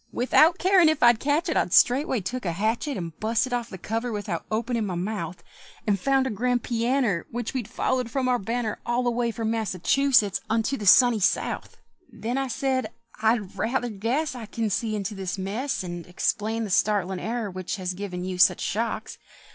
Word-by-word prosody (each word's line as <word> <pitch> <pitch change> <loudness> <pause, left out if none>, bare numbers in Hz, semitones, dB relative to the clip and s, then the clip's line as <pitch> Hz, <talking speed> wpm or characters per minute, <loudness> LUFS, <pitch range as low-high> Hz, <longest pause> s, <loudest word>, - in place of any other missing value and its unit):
Without 310 +7 +4
carin' 365 -3 +5
if 315 -4 0
I'd 240 -2 +6
catch 295 +6 +1
it, 320 - -1
I - - +2
straightway 250 - +3
took 250 +7 -4
a 175 -3 -1
hatchet, 225 - -1
And 165 -3 -6
busted 230 +4 0
off 240 -1 -2
the 190 - -8
cover 225 +6 -3
without 205 -5 -4
openin' 230 +1 -1
my 190 -4 -3
mouth; 180 -2 -4 0.4
And 205 -3 +1
found 270 +4 +2
a 260 - -1
grand 245 +3 0
pianner 235 -5 0
Which 240 -1 -4
we'd 250 -6 -3
followed 255 -2 -1
for 255 +2 -1
our 250 -1 +2
banner 225 +1 -2
All 240 +1 0
the 245 - +1
way 235 0 0
from 225 -1 -2
Massachusetts 225 +1 +2
unto 225 +4 +1
the 210 -5 -5
sunny 245 +2 +7
South! 190 - -1 0.3
Then 240 +4 -3
I 270 - -1
said, 260 +1 -1 0.3
"I 225 +2 +4
rather 235 +5 -2
guess 235 +9 -1
I 235 -4 -8
can 220 -1 -2
see 215 +2 -1
into 205 0 -3
this 195 -1 -4
mess, 205 +7 -2
And 175 -1 -6
explain 215 +5 -1
the 210 - -4
startlin' 190 -2 +1
error 225 -1 -3
which 185 +1 -4
has 185 -2 -3
given 180 -2 -5
you 185 -1 -4
such 185 - +5
shocks. 220 +1 -3
225 Hz, 195 wpm, -25 LUFS, 200-250 Hz, 0.4 s, sunny